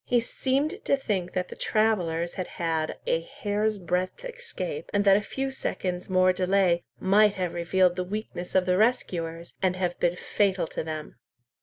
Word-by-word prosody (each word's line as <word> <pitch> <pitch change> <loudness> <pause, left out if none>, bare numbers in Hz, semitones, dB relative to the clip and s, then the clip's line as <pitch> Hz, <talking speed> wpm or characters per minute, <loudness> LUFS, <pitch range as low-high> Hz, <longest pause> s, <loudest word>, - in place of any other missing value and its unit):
He 245 - +2
seemed 275 - -1
to 275 - +3
think 190 -9 -2
that 180 -1 -1
the - - -8
travellers 175 -7 +1
had 185 - -4
had 160 -2 -2
a 165 - +1
hair's 210 +4 -1
breadth 185 - -2
escape, - - -5
and 205 0 +1
that 195 -1 +7
a 205 - +3
few 270 +5 -3
seconds' 180 -8 -3
more 185 0 +4
delay 185 -1 +2 0.2
might 205 +2 +4
have 180 -3 -2
revealed 180 +1 +2
the 180 - 0
weakness 185 -2 -5
of 185 -1 +4
the 180 0 +2
rescuers 170 -7 0
and 185 -1 +2
have 180 -1 -2
been 175 0 +2
fatal 190 0 +1
to - - -4
them. 155 -3 -6
185 Hz, 175 wpm, -27 LUFS, 175-215 Hz, 0.2 s, that